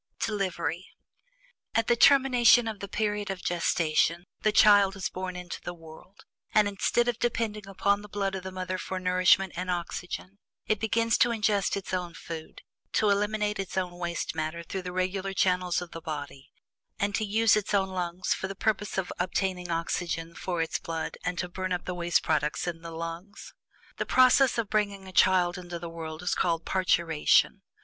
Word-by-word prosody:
DELIVERY. 190 -4 -2 0.9
At 225 - +3
the 240 - +3
termination 245 -2 +6
of 220 -2 -4
the 200 - -5
period 210 0 -2
of 190 -1 -5
gestation, 170 0 +1 0.2
the 215 - +3
child 205 -2 +6
is 195 - -3
born 185 0 -5
into 180 -1 -7
the 175 - -6
world, 165 +4 -15 0.3
and, 210 -1 +5
instead 205 +4 +1
of 240 -1 -1
depending 220 -4 -2
upon 200 +1 +1
the 210 - -12
blood 195 -1 -2
of 190 - -4
the 190 +1 -7
mother 185 0 -4
for 185 0 -4
nourishment 185 +1 +3
and 180 +1 -4
oxygen, 180 +2 -4 0.3
it 215 -1 0
begins 230 +1 +1
to 245 - +5
ingest 210 -4 +1
its 195 -1 -6
own 175 -2 -2
food, 160 -2 -8 0.3
to 210 -1 +3
eliminate 210 +1 0
its 195 -1 -4
own 180 -1 0
waste 170 -1 -3
matter 160 +1 -3
through 190 +3 -5
the 180 0 -6
regular 185 +2 -2
channels 180 -1 +1
of 175 - -12
the 165 - -8
body, 145 -4 -7 0.5
and 200 0 -1
to 215 - 0
use 220 +1 +3
its 210 -2 -1
own 195 -2 +2
lungs 180 -1 -2
for 190 - -4
the 195 - -6
purpose 210 -1 -1
of 190 -2 -2
obtaining 180 0 -1
oxygen 165 0 -2
for 175 -1 -2
its 160 - -3
blood 165 -1 -4
and 180 0 -2
to 180 - -2
burn 185 +1 -4
up 180 -1 -2
the 180 - -3
waste 175 -1 +1
products 150 -1 0
in 170 -2 -4
the 165 - -8
lungs. 165 +5 -7 0.4
The - - -2
process 255 0 +5
of 230 -3 0
bringing 200 -2 -1
a - - -9
child 180 -1 +4
into 175 -1 -6
the 170 0 -7
world 160 0 -7
is 180 - 0
called 165 -2 0
"parturition." 170 -4 +2
185 Hz, 190 wpm, -28 LUFS, 175-205 Hz, 0.9 s, termination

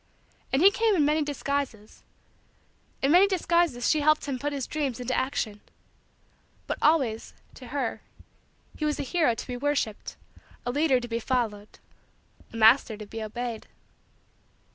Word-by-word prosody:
And 270 +5 +2
he 395 - +8
came 445 0 +2
in 300 -5 +3
many 305 +2 +2
disguises. 280 -6 -3 1.0
In 275 - +3
many 365 +4 +7
disguises 340 -9 +1
she 310 - +3
helped 305 +1 +3
him 270 -3 -3
put 290 +2 -2
his 275 -3 -3
dreams 280 -6 -3
into 250 +1 -3
action. 225 -6 -2 1.0
But - - -4
always, 265 -8 +1 0.2
to 255 - -12
her, 265 -3 -3 0.7
he - - -6
was 300 -1 0
a - - -1
hero 300 -4 +1
to - - -7
be 250 -1 -5
worshiped, 280 -6 -2 0.5
a 245 - -1
leader 285 -1 +2
to 240 - -7
be 230 0 -2
followed, 220 -4 -2 0.7
a 230 - -8
master 225 0 +5
to 210 - -8
be 225 +2 -7
obeyed. 230 +1 -5
265 Hz, 155 wpm, -27 LUFS, 230-300 Hz, 1.0 s, he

